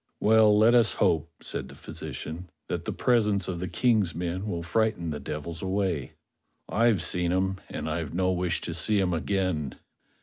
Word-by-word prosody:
"Well, 110 -1 +5
let 110 +3 +6
us 120 -3 +5
hope," 85 -5 +1
said - - -4
the - - -12
physician, 85 +4 -7 0.2
"that - - -3
the - - -2
presence 105 -5 +2
of 90 -2 -3
the 90 - -3
Ejng's 105 -1 +2
men 90 +4 -3
will 85 -4 -3
frighten 100 -2 0
the 75 - -4
devils 80 +2 -5
away. 95 -6 -1 0.5
I've 110 -6 +2
seen 90 -1 +1
'em, 95 +1 0
and - - -5
I've 80 -2 -3
no 95 +1 +1
wish 90 -2 0
to 85 - -4
see 100 +5 +1
'em 90 -2 +1
again." 85 -4 -1
90 Hz, 175 wpm, -27 LUFS, 85-105 Hz, 0.5 s, let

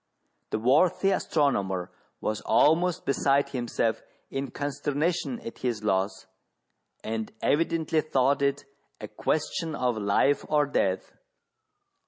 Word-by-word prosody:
The - - -1
worthy 155 - +3
astronomer 100 - 0 0.3
was 110 -1 -2
almost 175 +3 +3
beside 140 0 +2
himself 115 -3 -1 0.3
in 135 0 -3
consternation 145 - -2
at 230 - -8
his 115 -4 -2
loss, 95 -1 0 0.8
and 110 0 -3
evidently 160 +1 +1
thought 140 -2 +1
it 140 0 0 0.3
a - - -6
question 160 +1 -2
of 125 -4 0
life 105 +8 +2
or 150 -1 +3
death. 95 -9 -1
140 Hz, 110 wpm, -27 LUFS, 110-155 Hz, 0.8 s, worthy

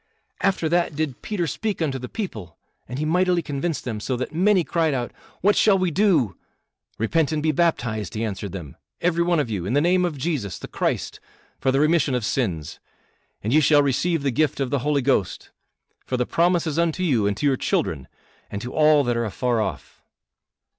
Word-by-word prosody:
After 190 -4 +1
that 170 -1 +1
did 145 -5 -3
Peter 200 -5 -2
speak 210 +5 -3
unto 140 -5 -1
the 125 - -7
people, 110 - -6 0.3
and 125 - -5
he 150 - -1
mightily 180 +1 +2
convinced 150 +3 -3
them, 115 -4 -4
so 125 +4 -2
that 130 +5 -4
many 185 +2 +3
cried 160 -3 0
out, 120 -2 -3 0.3
'What 205 +3 +4
shall 205 -3 +4
we 185 -2 0
do?' 160 - +2 0.6
'Repent 155 +7 +1
and 155 -1 -1
be 155 - +3
baptized,' 120 - 0
he 110 - -2
answered 100 -2 -4
them, 85 -8 -8 0.2
'every 170 -1 +1
one 170 -1 +2
of 130 -6 -1
you, 95 -5 -2
in 110 - -1
the 145 - +4
name 180 +4 +3
of 170 -5 -1
Jesus, 135 - -2
the - - -8
Christ, - - -2 0.4
for 130 - +1
the 135 - +2
remission 155 -3 +3
of 120 -4 -1
sins, 85 - -2 0.6
and 110 +5 0
ye 155 - +6
shall 145 -1 +5
receive 155 +3 0
the 140 - +1
gift 150 +3 0
of 135 -2 -1
the 140 - +1
Holy 145 +1 0
Ghost. 120 -9 0 0.6
For 125 - -1
the 125 - 0
promise 175 +3 +2
is 160 0 -1
unto 170 +2 0
you, 120 - +2
and 100 -1 -1
to 145 - -2
your 140 -2 +4
children, 70 - -1 0.4
and 100 - -4
to 125 - -6
all 155 -1 +5
that 120 -2 0
are 115 0 0
afar 115 +2 0
off." 70 -10 -5
145 Hz, 210 wpm, -23 LUFS, 120-170 Hz, 0.6 s, ye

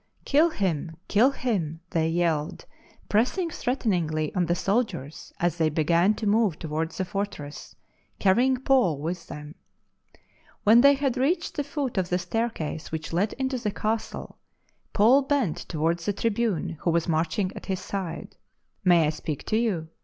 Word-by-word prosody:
" - - -37
Kill 305 +4 +5
him! 170 - -2
kill 225 +6 +5
him 195 - -2
!" - - -43
thej/ 160 -1 +1
yelled, 165 -2 -1 0.4
pressing 290 - +1
threateningly 175 - -1
on 180 -3 +1
the 175 - +2
soldiers 185 - -2
as 175 0 0
they 160 -1 +3
began 170 +6 +2
to 220 - -5
move 210 -5 +2
towards 160 +1 -3
the 190 - -1
fortress, 175 -6 -5 0.4
carrying 245 +7 +3
Paul 250 - +2
with 165 +4 -4
them. 150 0 -8 1.1
When 225 +3 +7
they 280 +1 +7
had 270 -2 -1
reached 330 +7 0
the 290 - -1
foot 280 -6 -2
of 180 -1 -2
the 180 - +2
staircase 180 -4 -3
which 160 0 -5
led 195 +5 +1
into 260 0 -2
the 225 -3 -1
castle, 215 +2 -3 0.5
Paul 235 +7 +5
bent 275 - 0
towards 165 +2 -1
the 205 - +2
tribune 200 -6 -1
who - - -1
was 170 0 +1
marching 170 +4 0
at - - -9
his 190 0 -4 0.5
" - - -48
May 165 -2 +5
I - - +2
.speak 155 -2 -5
to - - 0
you 190 -9 -1
190 Hz, 165 wpm, -26 LUFS, 165-235 Hz, 1.1 s, When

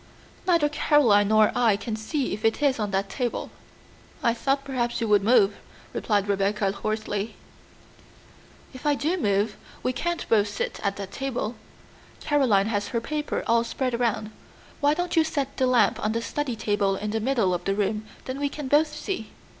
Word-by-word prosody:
Neither 335 -5 +4
Caroline 285 -9 +4
nor 215 0 +5
I 230 -5 +3
can 220 +1 -4
see 255 +6 -2
if 210 +2 -6
it 225 0 +2
is 275 -4 +3
on 210 -1 -1
that 195 0 0
table." 240 +4 -3 0.7
"I 235 - +3
thought 275 +4 0
perhaps 245 -4 -2
you 230 - -1
would 205 -2 +4
move," 205 -3 +4 0.4
replied 205 -2 0
Rebecca 200 0 +1
hoarsely. 215 +1 -3 1.4
"If 255 +3 -6
I 290 - +4
do 315 +6 0
move, 205 - 0 0.3
we 255 - 0
can't 345 +6 -2
both 210 -2 +3
sit 205 - -4
at 200 -1 -1
that 200 -1 -7
table. 255 -4 -3 0.7
Caroline 255 -10 +3
has 205 -2 -1
her 235 - -1
paper 300 +5 -3
all 230 0 +3
spread 255 +1 -2
around. 230 -2 -1 0.5
Why 290 +1 +3
don't 355 +1 -2
you 325 - +5
set 285 -4 -2
the 260 - +2
lamp 250 -2 +3
on 215 - +1
the 230 - -1
study 290 -3 -2
table 205 -2 0
in 210 +2 -3
the 225 - 0
middle 225 -6 +1
of 175 0 -3
the 195 - +1
room, 210 +1 -1 0.2
then 260 +1 -4
we 285 0 0
can 290 -1 -6
both 295 +4 +4
see?" 300 - -4
230 Hz, 185 wpm, -25 LUFS, 205-275 Hz, 1.4 s, nor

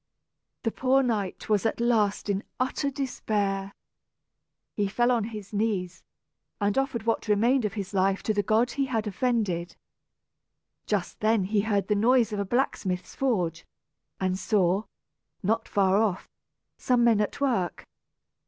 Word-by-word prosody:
The 225 - 0
poor 265 +3 +2
knight 210 -6 -2
was 210 -2 +2
at 225 - -1
last 220 -4 +1
in 200 +1 -1 0.2
utter 260 +2 0
despair. 205 -8 -2 1.0
He 205 -1 0
fell 240 +5 +2
on 235 -4 +1
his 215 -3 -8
knees, 195 -5 -1 0.6
and 205 -1 +1
offered 270 -5 -1
what 230 0 -1
remained 230 +4 +3
of 205 - -2
his 200 -2 -5
life 195 0 +1
to 215 - +1
the 205 - +1
God 225 +4 +2
he 275 +1 0
had 225 -4 -1
offended. 205 -5 -1 1.1
Just 205 -4 -2
then 215 -1 +2
he 205 +2 +1
heard 205 -2 0
the 210 - +2
noise 230 +1 +3
of 205 - -2
a 200 - -1
blacksmith's 190 -5 -1
forge, 180 - -1 0.6
and 185 0 0
saw, 195 0 +1 0.6
not 225 +4 0
far 195 -1 +3
off, 200 -5 -1 0.5
some 245 -1 +2
men 230 -3 +4
at 210 - -2
work. 235 - 0
215 Hz, 150 wpm, -27 LUFS, 195-235 Hz, 1.1 s, men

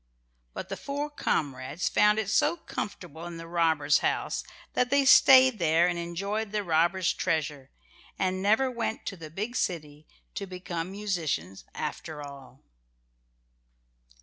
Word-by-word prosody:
But - - -6
the - - -4
four 290 +1 -4
comrades 140 - -2
found 210 0 +4
it 220 -3 -1
so 295 +10 +2
comfortable 175 - -6
in 170 -1 -7
the 165 - -8
robbers' 160 -4 +2
house - - -1 0.3
that 250 - +1
they 280 +1 +3
stayed 260 -3 +7
there 165 +1 +3
and 175 -1 -1
enjoyed 200 +5 -3
the 210 -1 -1
robbers' 170 +1 +2
treasure, 150 -6 -2 0.5
and 185 0 -1
never 220 +7 +3
went 235 -2 -3
to 195 - -4
the 165 -3 -9
big 210 +9 -4
city 150 -8 -3 0.3
to 200 - -5
become 180 -2 -5
musicians 165 - -3
after 150 0 -5
all. 140 -2 -12
175 Hz, 140 wpm, -28 LUFS, 155-210 Hz, 0.5 s, stayed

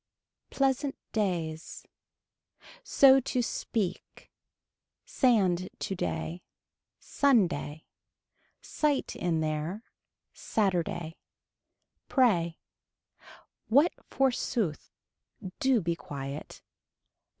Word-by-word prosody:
Pleasant 270 +1 0 0.2
days. 170 -7 -2 1.0
So 270 - +6
to 250 -1 -1
speak. 200 -5 -4 0.7
Sand 200 - +2
today. 175 -2 -3 0.6
Sunday. 180 - +1 0.8
Sight 295 -3 -1
in 165 -2 0
there. 155 +7 -3 0.5
Saturday. 175 -5 -1 0.9
Pray. 175 - +2 1.1
What 285 +9 +4 0.2
forsooth. 240 - 0 0.7
Do 265 -4 +3
be 170 -1 -1
quiet. 140 -2 -7
190 Hz, 60 wpm, -29 LUFS, 165-260 Hz, 1.1 s, So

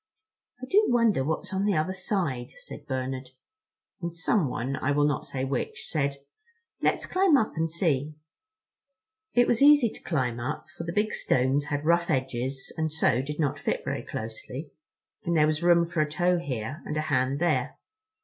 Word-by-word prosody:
"I 255 - -6
do 405 +11 +4
wonder 230 - +3
what's 160 +6 -3
on 190 +1 0
the 205 -2 +2
other 155 +5 0
side," 180 - -2
said - - -10
Bernard; 130 -1 -3 0.7
and 170 0 -3
someone, 145 - 0
I 130 - -1
will 145 +1 +3
not 145 -2 -1
say 130 -1 -2
which, 135 -1 -3
said: 140 -3 0 0.7
"Let's - - +1
climb 370 -5 +4
up 220 - 0
and 165 0 0
see." 155 -3 0 1.2
It 245 0 +6
was 240 0 +1
easy 285 -4 +7
to - - -12
climb 125 -7 -1
up, 130 +5 -4
for 170 - -6
the 170 - -3
big 210 +4 0
stones 130 +3 +1
had 145 0 -3
rough 170 +1 +3
edges 130 -1 -2
and 160 -1 0
so 130 -5 +2
did 150 +3 -6
not 145 -4 0
fit - - -2
very - - -2
closely, 115 +7 -6 0.5
and 170 -4 +1
there 150 - +5
was 155 +1 0
room 170 -1 +5
for 170 -1 -1
a 150 - 0
toe 175 +3 +2
here 130 -1 -4
and 150 - -4
a - - +1
hand 135 -3 +1
there. 175 +3 0
155 Hz, 180 wpm, -27 LUFS, 130-175 Hz, 1.2 s, easy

